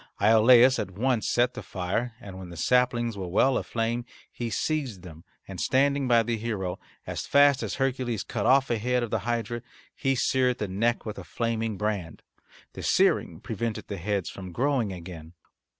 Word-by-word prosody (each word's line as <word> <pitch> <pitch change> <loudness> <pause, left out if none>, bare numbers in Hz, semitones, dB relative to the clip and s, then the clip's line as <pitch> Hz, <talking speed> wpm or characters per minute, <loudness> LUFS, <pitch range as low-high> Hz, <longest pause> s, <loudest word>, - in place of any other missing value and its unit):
Iolaus 120 +5 +6
at - - -2
once 115 +4 0
set 120 +1 +2
the - - -6
fire, 100 +6 -3
and 95 -5 -9
when 90 -2 -9
the 85 - -10
saplings 120 - +2
were 95 -2 -5
well 125 +9 +3
aflame 120 0 -1 0.3
he 120 -1 -4
seized 125 - -2
them 80 -3 -11 0.2
and, 95 -2 -6
standing 140 +1 +2
by 120 -2 +5
the 115 0 -1
hero, 105 -5 -3 0.3
as - - -5
fast 140 -1 +5
as - - -3
Hercules 130 -5 -1
cut - - -2
off 135 0 +4
a 115 - +1
head 125 +2 0
of 115 - -5
the - - +1
hydra 120 0 -2 0.3
he 135 0 0
seared 125 0 +1
the 105 - -3
neck 115 +5 0
with 110 +1 -5
a - - -8
flaming 115 -2 -2
brand. 100 -6 -3 0.5
The - - -7
searing - - +2
prevented 115 -2 -4
the 100 - -4
heads 100 +1 -2
from 95 -2 -8
growing 125 0 0
again. 85 -2 -9
115 Hz, 180 wpm, -27 LUFS, 100-125 Hz, 0.5 s, Iolaus